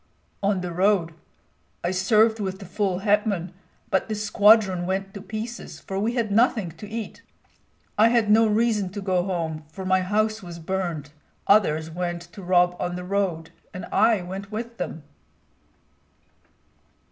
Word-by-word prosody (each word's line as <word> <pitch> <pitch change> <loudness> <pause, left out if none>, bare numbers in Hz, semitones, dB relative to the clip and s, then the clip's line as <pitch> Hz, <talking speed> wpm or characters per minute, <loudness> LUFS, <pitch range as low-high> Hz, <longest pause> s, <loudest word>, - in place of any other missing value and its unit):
"On 200 -2 +1
the 180 -1 -4
road. 180 -2 +2 0.7
I 175 - 0
served 215 +4 +3
with 190 -2 -3
the 195 - -10
full 190 0 -1
hetman; 205 -4 +1 0.4
but 190 - +1
the 215 - -1
squadron 205 -3 +4
went 195 +1 -2
to 200 - -7
pieces, 220 +4 -6
for 195 0 -4
we 220 +4 0
had 230 -4 0
nothing 215 -4 +2
to 200 +6 -11
eat. 225 -1 -6 0.8
I 220 - +7
had 230 -2 +3
no 220 +2 +5
reason 215 -2 +1
to 205 - -4
go 185 -2 +1
home, 165 -4 -3
for 190 +3 -7
my 185 0 +3
house 215 +3 0
was 175 -2 -8
burned. 170 -4 -3 0.3
Others 160 -6 +3
went 175 0 -3
to 200 - -9
rob 180 -1 +3
on 175 0 -2
the 180 - -5
road, 180 -4 -1 0.2
and 185 - -5
I 220 -5 +3
went 195 +3 -7
with 235 +2 -6
them." 160 - -4
195 Hz, 160 wpm, -24 LUFS, 180-215 Hz, 0.8 s, I